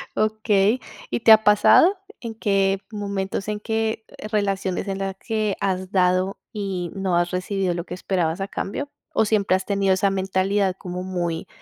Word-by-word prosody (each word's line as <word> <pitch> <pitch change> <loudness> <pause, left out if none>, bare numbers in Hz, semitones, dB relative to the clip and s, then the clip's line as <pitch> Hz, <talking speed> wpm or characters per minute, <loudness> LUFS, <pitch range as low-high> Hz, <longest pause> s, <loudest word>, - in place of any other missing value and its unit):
Okey. 215 +1 +2 0.3
¿Y - - -1
te 225 - +6
ha 220 0 +8
pasado? 270 - +6 0.2
¿En 230 -2 -5
qué 195 -3 +1
momentos, 200 -2 -3
en 210 0 -2
qué 220 +1 -2 0.3
relaciones 195 -2 -1
en 195 -1 -2
las 195 -1 -3
que 215 -2 -1
has 185 -1 -1
dado 185 0 +2
y 190 -5 -3
no 190 -2 0
has 175 0 +1
recibido 185 0 -1
lo 170 +1 -4
que - - -7
esperabas 180 -2 -1
a 195 - -2
cambio? 245 +8 -4 0.2
¿O - - +3
siempre 205 -3 +2
has 190 0 -2
tenido 195 -1 +2
esa 190 +1 +2
mentalidad 190 0 0
como 180 0 -6
muy 175 -3 -3
195 Hz, 170 wpm, -23 LUFS, 185-210 Hz, 0.3 s, ha